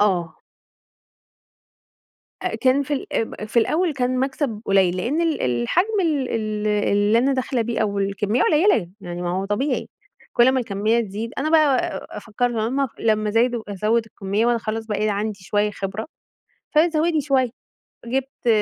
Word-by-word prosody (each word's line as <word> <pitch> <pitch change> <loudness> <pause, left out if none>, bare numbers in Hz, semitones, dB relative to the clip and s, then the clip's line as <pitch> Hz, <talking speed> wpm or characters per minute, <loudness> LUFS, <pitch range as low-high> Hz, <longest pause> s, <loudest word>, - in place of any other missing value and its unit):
آه. 175 -6 +1 2.1
آآ، - - -1
كان 265 +2 +3
في 290 - -3
ال 275 - -4
اب 220 -1 -2
في 235 - +3
الأول 320 +8 +1
كان 255 -1 0
مكسب 265 -4 -2
قليّل 190 -2 +3
لأن 280 - 0
ال 330 -2 0
الحجم 130 - +1
ال 295 -7 0
ال 215 -1 -2
اللي 205 +1 +2
أنا 265 +4 +2
داخلة 260 -1 -1
بيه 230 +1 -2
أو 200 -2 0
الكمية 200 +4 0
قليّلة، 305 - +3
يعني 175 -1 -6
ما 175 - -2
هو 190 +2 -1
طبيعي، 210 +9 -1 0.4
كُلّ 240 +2 +5
ما 260 - +1
الكمية 220 0 +1
تزيد، 220 +2 -5
أنا 305 - 0
بقى 305 -4 +1
فكرت 240 +3 -1
لمّا 240 +5 0
لمّا 215 -1 +1
زادوا 235 +1 +1
أزوّد 220 +4 +1
الكمية 205 0 -2
وأنا 240 0 +3
خلاص 225 0 -4
بقى 215 0 -1
عندي 205 0 -2
شوية 210 +2 0
خبرة، 195 +2 -5 0.7
فزوّدي 320 0 +3
شوية، 265 -3 +2 0.6
جِبت 265 +1 -3
225 Hz, 155 wpm, -22 LUFS, 205-265 Hz, 2.1 s, كُلّ